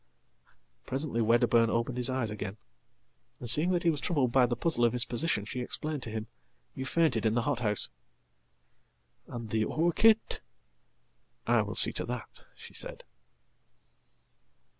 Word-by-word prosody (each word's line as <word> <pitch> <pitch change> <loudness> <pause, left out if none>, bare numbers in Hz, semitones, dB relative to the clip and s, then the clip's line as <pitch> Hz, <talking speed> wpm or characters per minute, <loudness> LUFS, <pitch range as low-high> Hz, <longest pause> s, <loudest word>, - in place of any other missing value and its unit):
"Presently 135 -3 -1
Wedderburn 115 0 +3
opened 115 +2 -2
his 125 0 +2
eyes 130 -4 -1
again, 105 -1 -6 0.8
and, 120 - -7
seeing 150 +9 +8
that 175 -2 0
he 170 - +3
wastroubled 145 -4 -1
by 125 0 +4
the 120 - -2
puzzle 155 -6 0
of 120 -1 +3
his 125 -1 -1
position, 120 -4 -1
she 125 +4 -6
explained 150 +4 -4
to 115 - -5
him, 110 0 -5 0.5
"You 130 - -6
faintedin 120 -8 +1
the 120 - +1
hothouse.""And 105 - -6
the 110 -1 +1
orchid?""I 175 - -1
will - - -5
see - - +4
to - - -3
that," - - -8
she - - -13
said. - - -1
120 Hz, 135 wpm, -29 LUFS, 110-150 Hz, 0.8 s, seeing